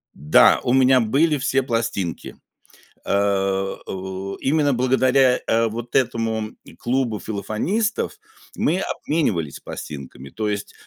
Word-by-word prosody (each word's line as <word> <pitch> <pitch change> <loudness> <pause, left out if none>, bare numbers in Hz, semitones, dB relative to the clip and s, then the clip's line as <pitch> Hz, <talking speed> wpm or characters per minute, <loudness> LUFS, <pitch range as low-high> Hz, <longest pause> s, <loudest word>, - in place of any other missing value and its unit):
Да, 75 +3 +5
у 120 - +1
меня 130 0 +5
были 145 +7 +2
все 135 0 +1
пластинки, 115 - -3 0.7
э, - - -3
о, 95 -1 -2
именно 145 0 +2
благодаря, 130 +1 +3
э, 115 0 +2
вот 120 +2 -6
этому 115 -3 0 0.2
клубу 120 -3 -1
филофонистов 110 - -2 0.4
мы 180 +4 +1
обменивались 105 - -2
пластинками, 70 -2 -8
то 110 +6 -3
есть 105 -1 -4
115 Hz, 110 wpm, -22 LUFS, 100-130 Hz, 0.7 s, Да